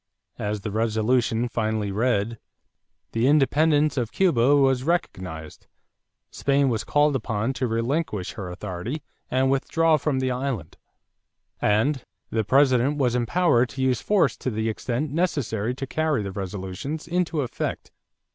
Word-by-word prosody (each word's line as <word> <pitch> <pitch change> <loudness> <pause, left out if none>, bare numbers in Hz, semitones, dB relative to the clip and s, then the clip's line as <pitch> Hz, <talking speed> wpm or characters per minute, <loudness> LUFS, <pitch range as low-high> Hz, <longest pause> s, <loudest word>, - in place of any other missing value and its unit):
As 105 0 -2
the 105 - -4
resolution 115 +2 +1
finally 110 -3 -1
read, 115 0 0 0.7
the 115 +3 +1
independence 150 +1 +3
of 120 -3 -1
Cuba 145 -8 +3
was 135 -2 +3
recognized; 95 - -3 0.6
Spain 140 -1 +2
was 110 -3 -1
called 145 -1 +2
upon 115 0 -1
to 125 0 -1
relinquish 115 - -1
her 100 -5 -6
authority 100 - -5 0.3
and 130 +1 +2
withdraw 160 +4 +2
from 145 -1 -1
the 130 -1 0
island; 125 - -3 0.8
and 115 +6 +2 0.3
the 110 -1 +1
President 130 +3 +3
was 125 -4 +1
empowered 125 0 +2
to 135 0 -4
use 130 -2 +1
force 205 -2 +2
to - - -3
the 110 -1 -1
extent 125 +6 -2
necessary 130 - -1
to 135 - -4
carry 155 -4 0
the 100 - -4
resolutions 95 - -5
into 170 -2 0
effect. 125 - -4
125 Hz, 135 wpm, -24 LUFS, 110-145 Hz, 0.8 s, independence